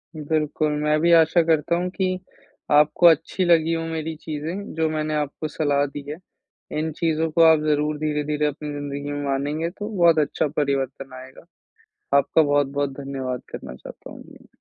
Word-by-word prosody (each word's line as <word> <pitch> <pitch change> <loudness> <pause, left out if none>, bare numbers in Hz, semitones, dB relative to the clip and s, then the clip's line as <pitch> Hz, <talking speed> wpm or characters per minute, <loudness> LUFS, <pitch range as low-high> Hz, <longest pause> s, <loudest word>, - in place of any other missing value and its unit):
बिल्कुल, 155 0 -1
मैं 150 0 +2
भी 170 +1 +3
आशा 165 +1 +5
करता 160 0 +1
हूँ 180 +1 -1
कि 185 -1 -1 0.5
आपको 150 +4 +4
अच्छी 165 +3 +2
लगी 165 -1 +3
हो 165 0 -2
मेरी 160 0 -4
चीज़ें 160 +7 -5
जो 160 -1 +1
मैंने 155 0 -2
आपको 150 +1 -3
सलाह 145 -2 0
दी 145 +1 -7
है, 150 - -5 0.6
इन 160 +1 -2
चीज़ों 160 -1 0
को 165 - +2
आप 160 - +4
ज़रूर 150 0 +1
धीरे-धीरे 150 0 -1
अपनी 150 +1 -3
ज़िंदगी 145 0 -5
में 145 0 -4
मानेंगे 145 +4 -1
तो 205 +4 -7
बहुत 170 -2 +5
अच्छा 150 0 0
परिवर्तन 135 -2 -2
आएगा। 130 0 -14 0.7
आपका 160 +3 +3
बहुत-बहुत 145 -1 0
धन्यवाद 135 -2 -4
करना 65 - -7
चाहता - - -12
हूँ - - -11
मैं। - - -17
150 Hz, 170 wpm, -23 LUFS, 145-160 Hz, 0.7 s, आशा